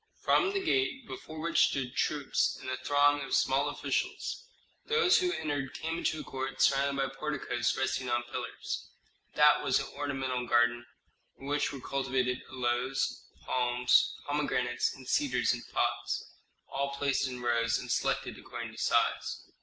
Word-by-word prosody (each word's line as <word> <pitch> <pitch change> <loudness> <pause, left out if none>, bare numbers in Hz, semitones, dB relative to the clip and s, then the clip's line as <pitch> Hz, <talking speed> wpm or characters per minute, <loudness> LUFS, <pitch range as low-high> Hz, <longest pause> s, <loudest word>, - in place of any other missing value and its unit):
From 390 0 +3
the 395 - 0
gate, 360 -9 +1
before 155 +2 -8
which 165 -1 +3
stood 130 -2 -3
troops 145 -4 +1
and 130 - -5
a 130 - -2
throng 145 0 +3
of 135 -1 -1
small 135 +1 +2
officials, - - -3 0.4
those 455 -5 +4
who 360 -1 +1
entered 145 -3 -3
came 165 +1 -3
into 155 -2 -1
a - - -7
court 135 0 -5
surrounded 140 0 +3
by 135 - -10
porticos 145 -5 -1
resting 130 -1 -1
on 120 0 +1
pillars. 120 - -5 0.5
That - - +6
was - - +3
an - - -3
ornamental 135 -3 -2
garden, 120 0 +3 0.5
in 135 - -11
which 145 +1 0
were 140 - -7
cultivated 130 -2 -1
aloes, 125 +1 -1 0.2
palms, 125 0 +2
pomegranates, 125 -4 0
and 130 -2 -13
cedars 125 -4 +2
in 120 - -4
pots, - - -1 0.4
all 140 0 -2
placed 140 -1 +1
in 125 -1 -6
rows 115 -1 +1
and - - -5
selected - - -1
according - - -7
to - - -11
size. - - +1
135 Hz, 155 wpm, -31 LUFS, 125-145 Hz, 0.5 s, That